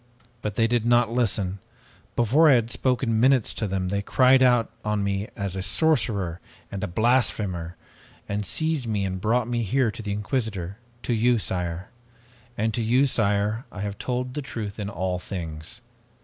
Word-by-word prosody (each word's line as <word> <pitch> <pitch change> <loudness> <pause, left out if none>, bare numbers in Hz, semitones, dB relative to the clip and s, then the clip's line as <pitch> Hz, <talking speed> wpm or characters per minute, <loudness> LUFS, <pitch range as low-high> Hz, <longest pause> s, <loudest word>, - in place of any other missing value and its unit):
"But 105 -2 -3
they 115 - +3
did 120 -1 +1
not 120 -1 +3
listen. 100 -5 0 0.6
Before 140 +8 +4
I - - +7
had 120 -1 +2
spoken 125 -2 +1
minutes 130 -1 +3
to 110 - -2
them 95 -1 -2
they 100 +1 0
cried 130 +5 +4
out 125 -3 +4
on 105 -1 0
me 100 +1 -1
as 100 -2 -3
a 95 - -2
sorcerer 100 - +1 0.3
and 100 0 -4
a - - 0
blasphemer, 100 -5 0 0.5
and 105 +1 -2
seized 155 - -1
me 105 -3 0
and 95 -1 -4
brought 115 +2 +1
me 120 -1 -1
here 120 +2 +1
to 115 - -8
the 105 -2 -4
Inquisitor, 105 -3 -3 0.2
to 120 - 0
you, 120 +2 +3
sire. 90 -2 -3 0.7
And 110 +1 0
to 120 - -1
you, 125 +5 +3
sire, 105 -1 0
I 105 - -7
have 100 0 -4
told 125 0 -2
the 150 - -3
truth 110 -6 -6
in 100 -1 -3
all 90 -1 -2
things. 85 +1 -6
110 Hz, 175 wpm, -25 LUFS, 100-120 Hz, 0.7 s, I